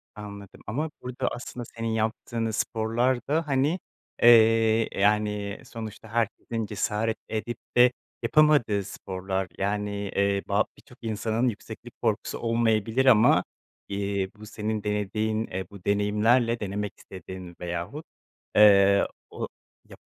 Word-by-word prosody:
Anladım 100 -2 -10
ama 150 +9 -2
burada 125 0 -3
aslında 120 0 -6
senin 115 0 -6
yaptığın 110 +1 -1
sporlar 115 +3 0
da, 155 +2 0
hani, 145 +6 +1 0.4
eee, 115 -1 +6
yani, 105 0 +1
sonuçta 110 -1 -8
herkesin 115 0 -1
cesaret 110 +2 -1
edip 110 +2 -3 0.2
de 125 0 +7 0.3
yapamadığı 145 -10 +4
sporlar. 95 0 -4
Yani, 105 +1 -1 0.3
eee, 100 0 +2
ba - - +2
birçok - - -18
insanın 115 +2 0
yükseklik 105 - -9
korkusu - - -1
olmayabilir 115 +1 +1
ama, 110 -4 +6 0.4
iii, 100 -1 -2
bu 105 - -11
senin 110 0 -3
denediğin, 105 +2 -1
eee, 95 +1 -4
bu 100 -3 -13
deneyimlerle, 110 +4 +2
denemek 105 0 -3
istediğin 95 -2 -10
veyahut, 85 - -4 0.5
eee, 100 -1 +7 0.2
o - - -5 0.4
yap - - -13
110 Hz, 120 wpm, -26 LUFS, 100-115 Hz, 0.5 s, de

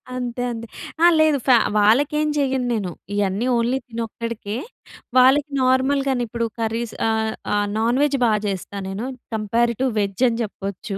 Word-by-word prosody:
అంతే 245 -1 -4
అండి. 230 0 -6 0.4
ఆ! - - +8
లేదు 310 -2 +4
ఫ్యా 255 -2 +7 0.2
వాళ్ళకెం 280 +9 +3
చెయ్యను 265 -2 0
నేను. 200 -6 -2 0.2
ఇయన్నీ 200 +2 0
ఓన్లీ 235 +3 +1
తనొక్కడికే.. 230 -2 -5 0.6
వాళ్ళకి 270 +3 +5
నార్మల్‌గానే, 260 0 +2
ఇప్పుడు 230 +1 -2
కర్రీస్ 225 0 -2
ఆహ్, 220 0 0 0.2
ఆ! - - +2 0.2
నాన్ 235 +4 +1
వేజ్ 285 -1 +1
బాగా 215 -2 +2
చేస్తా 195 0 -4
నేను, 200 +5 -4 0.3
కంపారెడ్ 230 +2 0
టు 265 - +3
వెజ్ 200 +3 -1
అని 230 0 -2
చెప్పచ్చు. 200 0 -6
235 Hz, 150 wpm, -22 LUFS, 215-260 Hz, 0.6 s, ఆ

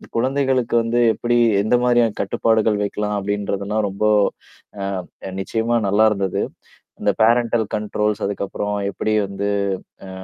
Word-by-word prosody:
குழந்தைகளுக்கு 130 -1 +1
வந்து 120 +1 0
எப்படி 120 +1 0 0.3
எந்த 110 - +2
மாதிரியான 120 -3 +3
கட்டுப்பாடுகள் 110 +1 +1
வைக்கலாம் 105 +1 -2
அப்படின்றதெல்லாம் 100 +1 -2
ரொம்ப 100 +3 -2 1.2
அ - - -6
நிச்சயமா 115 +4 0
நல்லாருந்தது. 100 -2 +2 0.6
இந்த 105 0 +3
பேரன்டல் 115 0 +3
கண்ட்ரோல்ஸ் 105 0 -1
அதுக்கப்புறம் 100 +1 -3 0.2
எப்படி 110 - -2
வந்து 100 +1 -3 0.6
அ, - - -9
105 Hz, 110 wpm, -21 LUFS, 100-115 Hz, 1.2 s, மாதிரியான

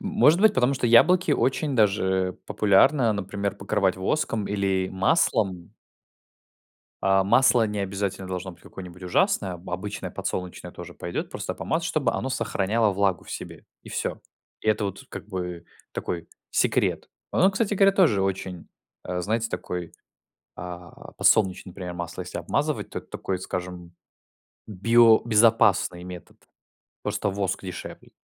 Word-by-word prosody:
Может 200 -5 +3
быть, 215 0 +5
потому 130 -2 +2
что 125 - -1
яблоки 165 +8 +5
очень 140 +1 0
даже 95 -3 +2
популярно, 110 +4 +4
например, 100 0 -3
покрывать 100 -2 0
воском 105 +1 -1
или 95 -2 0
маслом 95 - +1 1.3
А, 95 0 +3
масло 120 +1 +4
не 105 0 -4
обязательно 100 -1 -3
должно 95 0 -4
быть 85 - -19
какое-нибудь 90 -1 -11
ужасное. 90 +1 +1
Обычное 90 +3 -5
подсолнечное 90 -1 -5
тоже - - -10
пойдет, - - -5
просто - - -4
помазать, 165 +1 -2
чтобы 145 -8 0
оно 130 - -2
сохраняло 110 -2 0
влагу 95 -2 0
в - - -12
себе. - - -8 0.2
И - - -13
всё. - - -3 0.4
И 110 - -3
это 105 -1 +2
вот, 95 -1 -5
как - - -8
бы, 90 -3 -5 0.3
такой 85 -2 -4 0.2
секрет. - - +1 0.2
Оно, 190 - +4
кстати 205 +1 -1
говоря, 195 0 +5
тоже 165 - +3
очень, 95 -2 -3 0.4
э, 90 0 -3
знаете, 115 +3 -1
такой, 90 -2 -5 0.6
а, 90 0 -9
подсолнечный 95 -3 +2
пример 90 -1 -6
масло, 85 -1 -6
если - - -6
обмазывать, - - -1
то - - -4
это - - -14
такой, 95 - -3
скажем, 90 -1 -6 0.7
биобезопасный 110 -3 +4
метод. 90 -2 -10 0.7
Просто - - -1
воск 95 -1 -2
дешевле. 90 -2 -8
100 Hz, 140 wpm, -25 LUFS, 90-115 Hz, 1.3 s, быть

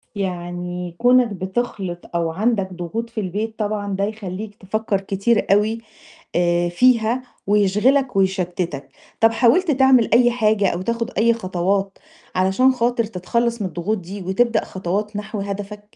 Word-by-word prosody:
يعني 175 -2 -4
كونك 245 +1 +5
بتخلِط 190 -2 -3 0.2
أو 165 -1 0
عندك 195 0 0
ضغوط 200 +7 -4
في 225 -2 -4
البيت 215 +4 -4
طبعًا 205 -2 -2
ده 195 - -1
يخليك 205 0 -5
تفكّر 205 0 -2
كتير 200 +3 +1
أوي 215 +3 +2 0.6
آآ، 175 0 +2
فيها 235 +4 +3 0.2
ويشغلك 210 +6 +2
ويشتِّتك، 185 -5 -1 0.3
طَب 225 0 +5
حاولت 310 +10 +3
تعمل 265 -4 +4
أي 240 0 +5
حاجة 215 -4 +2
أو 175 +2 -2
تاخد 230 +3 -2
أي 235 +1 +4
خطوات، 195 -1 -1 0.4
علشان 190 +8 +3
خاطر 240 -1 0
تتخلّص 230 +3 -1
من 190 - -1
الضغوط 180 +5 -2
دي، 190 +3 -8
وتبدأ 225 +6 +1
خطوات 200 +3 -3
نحو 210 0 -4
هدفك؟ 200 +1 -5
205 Hz, 140 wpm, -21 LUFS, 185-230 Hz, 0.6 s, كونك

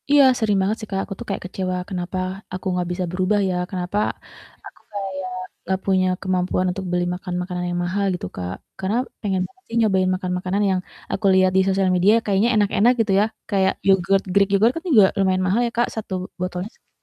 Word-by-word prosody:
Iya, 290 0 +7 0.2
sering 210 -3 +2
banget 205 +4 0
sih, 215 - -7
Kak, 195 - 0
aku 195 - -6
tuh - - -6
kayak - - -3
kecewa, 185 0 -3
kenapa 180 -1 -4 0.4
aku 185 - -6
nggak 180 -1 -1
bisa 180 +1 -2
berubah 185 +3 +1
ya, 180 - -1
kenapa 180 +1 -3 0.7
aku - - -13
kayak 190 -2 -4 0.3
nggak 190 +1 -1
punya 190 -1 +3
kemampuan 185 -1 0
untuk 190 +1 -5
beli 175 0 +1
makan 180 0 -5
makanan 180 0 -4
yang 175 0 -2
mahal, 200 +3 0
gitu, 180 - -4
Kak. 90 0 -4 0.2
Karena 195 +3 -1 0.3
pengen 195 -3 0
banget 375 0 -29
sih, 230 - -5
nyobain 190 -4 +3
makan 185 0 -4
makanan 185 +3 -1
yang 190 -1 +1 0.3
aku 215 - -2
liat 185 0 +4
di - - +6
sosial 190 0 +2
media, 185 +4 +5
kayaknya 205 +3 +2
enak-enak, 210 +3 +4
gitu 220 -3 0
ya, - - +4 0.2
kayak 190 -2 +2
yogurt, 195 0 +3
greek 200 0 +4
yogurt, 220 +5 +4
kan 330 - -5
juga 220 -10 +7
lumayan 185 -1 +2
mahal 205 +6 +2
ya, - - -4
Kak, 240 - +3
1 215 -3 -5 0.3
botolnya 180 +2 -3
sekitar - - -34
190 Hz, 210 wpm, -22 LUFS, 185-205 Hz, 0.7 s, Iya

